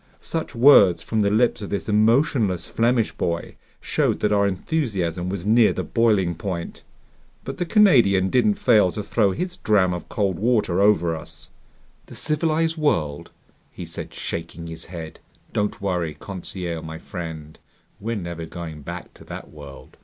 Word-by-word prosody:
Such 165 -6 -4
words 115 -8 +6
from 110 - -1
the 100 - +2
lips 110 +2 +2
of 100 - -6
this 100 - -3
emotionless 110 - +2
Flemish 115 0 +1
boy 85 0 -3 0.3
showed - - 0
that 105 - +1
our 100 -1 +3
enthusiasm 95 - -2
was 95 -1 -4
near 110 +1 +5
the - - -3
boiling 105 -7 +2
point. 85 0 -5 0.6
But 135 - -7
the 175 - -1
Canadian 120 - +4
didn't 205 +11 +3
fail 110 - +4
to 105 - -4
throw 105 0 +2
his 180 - -4
dram 100 - +2
of 90 -2 -7
cold 95 -5 -1
water 105 -5 +1
over 85 -5 +3
us. 80 -2 -11 0.6
"The - - -11
civilized 160 +1 +1
world!" 75 - 0 0.4
he - - -8
said, - - -7
shaking 85 0 -6
his 80 -1 -7
head. 85 -3 -8 0.3
"Don't 105 0 -1
worry, 90 -6 -2
Conseil 90 -3 -5
my 80 0 -7
friend, 80 -4 -8 0.4
we're 115 +3 -3
never 85 -4 -5
going 80 -3 -8
back - - -8
to - - -15
that - - -9
world!" 70 -3 -12
100 Hz, 160 wpm, -23 LUFS, 85-115 Hz, 0.6 s, words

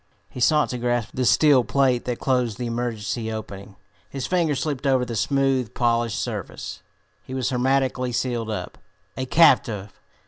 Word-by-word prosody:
He - - -8
sought 150 +4 +3
to 125 - -4
grasp 120 -2 -1
the 130 - -1
steel 145 -3 +5
plate 130 +1 +1
that 125 -1 -2
closed 125 -5 0
the 125 - -4
emergency 115 -1 -3
opening. 100 -2 -7 0.3
His 135 -2 -4
fingers 165 -6 +1
slipped 145 -3 -2
over 130 -2 +2
the 115 -1 -5
smooth, 135 -1 0
polished 120 -2 +1
surface. - - -5 0.4
He 130 - -7
was 130 0 -1
hermetically 130 0 +1
sealed 120 -2 -2
up 105 - -5 0.4
a 130 0 -4
captive! 110 - +3
125 Hz, 160 wpm, -23 LUFS, 115-135 Hz, 0.4 s, steel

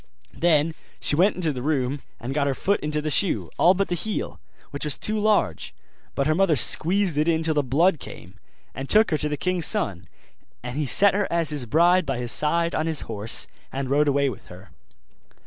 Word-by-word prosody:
Then 160 -2 +2 0.3
she - - +1
went 185 +6 +3
into 165 -4 -1
the 125 - -6
room 140 -1 -1 0.2
and 125 +3 -5
got 140 -1 0
her 135 - -1
foot 200 +8 0
into 150 0 -3
the 155 - -2
shoe, 190 +6 0
all 180 +2 +5
but 195 +1 0
the - - -3
heel, 210 +5 -4 0.3
which 140 - -5
was 150 -4 0
too 215 0 -1
large. 210 - 0 0.4
But 140 - 0
her 155 - +2
mother 175 -1 +2
squeezed 170 - +2
it 155 - +1
in 160 -1 +1
till 160 0 +1
the 150 - +2
blood 155 +6 +2
came, 90 -6 -11 0.4
and 135 0 -7
took 215 -1 +4
her 155 - +2
to 150 - -2
the 150 - -3
king's 180 -1 0
son: 90 -3 0 0.6
and 125 - -6
he 150 -1 -2
set 200 +10 +4
her 205 0 -1
as 170 -2 +1
his 140 -5 -3
bride 175 +6 +3
by 135 -2 -2
his 120 -1 -3
side 170 +2 +1
on 155 - -1
his 160 -3 -2
horse, 110 0 -2 0.3
and 135 0 -4
rode 145 +1 +3
away 140 0 +2
with 125 -7 -7
her. 90 +2 -14
150 Hz, 215 wpm, -24 LUFS, 135-175 Hz, 0.6 s, all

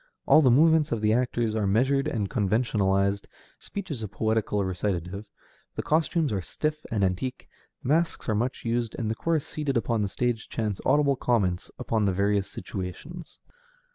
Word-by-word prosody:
All 155 - +7
the 135 - +5
movements 155 +4 +5
of 115 - 0
the 110 0 +3
actors 120 -2 0
are 110 -2 0
measured 130 +7 +2
and 105 -4 -1
conventionalized, 100 -3 +1 0.3
speech 200 -4 -6
is 130 -6 -4
a 110 - -3
poetical 105 0 0
recitative, 95 +1 -3 0.5
the - - -3
costumes 160 - +1
are 95 - -1
stiff 155 - -3
and 105 -3 0
antique, 95 +8 -2 0.4
masks 165 +6 +1
are 110 - +2
much 120 +5 -2
used, 115 -1 -1
and 110 -3 -2
a - - +1
chorus 160 +5 0
seated 145 -4 -2
upon 115 -1 0
the 100 - +1
stage 120 0 -2
chants 105 -4 -2
audible 140 0 +4
comments 100 -9 0
upon 110 -2 0
the 95 - +2
various 100 +1 +1
situations. 110 - -7
115 Hz, 170 wpm, -27 LUFS, 100-135 Hz, 0.5 s, All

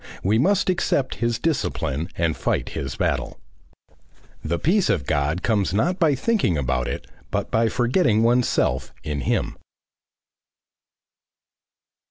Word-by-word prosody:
We 105 +4 +2
must 195 +8 +2
accept 175 -7 +1
his 115 -1 +1
discipline 90 - -1
and 80 -2 +1
fight - - -1
his 70 -1 -5
battle. - - -2 1.0
The 85 +2 -1
peace 185 - +2
of 70 - +1
God 75 +4 0
comes 100 -6 +1
not 175 - +1
by 155 -5 +3
thinking 135 - +1
about 65 -3 -1
it - - -4 0.2
but - - -2
by 115 0 +2
forgetting 120 - +2
oneself 115 - +1
in 75 -2 -3
him. - - -1
110 Hz, 125 wpm, -23 LUFS, -, 1.0 s, by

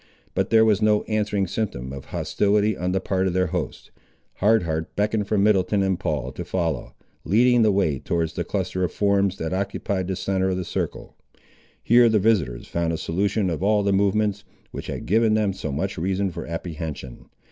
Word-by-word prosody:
But - - 0
there 110 0 +5
was 105 -2 +3
no 105 -1 +3
answering 105 -2 0
symptom 75 - -4
of 70 -1 -8
hostility 105 +1 +1
on 90 +1 -2
the 95 - +1
part 95 0 0
of 90 - -1
their 90 0 +2
hosts. - - -4 0.5
Hard 110 +1 +3
Heart 80 -1 -3
beckoned 105 0 0
for 105 - 0
Middleton 100 0 +3
and 95 -2 0
Paul 65 -4 -2
to 90 - -6
follow, 85 -5 -2 0.3
leading 120 +5 +4
the 110 -1 +4
way 90 -9 +1
towards 85 -2 -1
the - - -2
cluster 95 - -2
of 90 - 0
forms, 100 -1 +1
that 80 +2 -3
occupied 100 -1 -2
the 95 - -2
centre 95 +1 0
of 90 - -1
the 90 - -3
circle. - - -4 0.7
Here 120 0 +6
the 110 - +3
visiters 95 - +1
found 85 -1 -1
a 80 - -2
solution 95 +3 0
of 80 - -3
all 105 +1 +2
the 100 0 +2
movements, 100 +1 +1 0.3
which - - -7
had - - -5
given 110 +2 +3
them 105 -3 +1
so 95 - -5
much 95 +7 -3
reason 95 +2 0
for - - -7
apprehension. 80 -6 -6
95 Hz, 195 wpm, -23 LUFS, 85-105 Hz, 0.7 s, Here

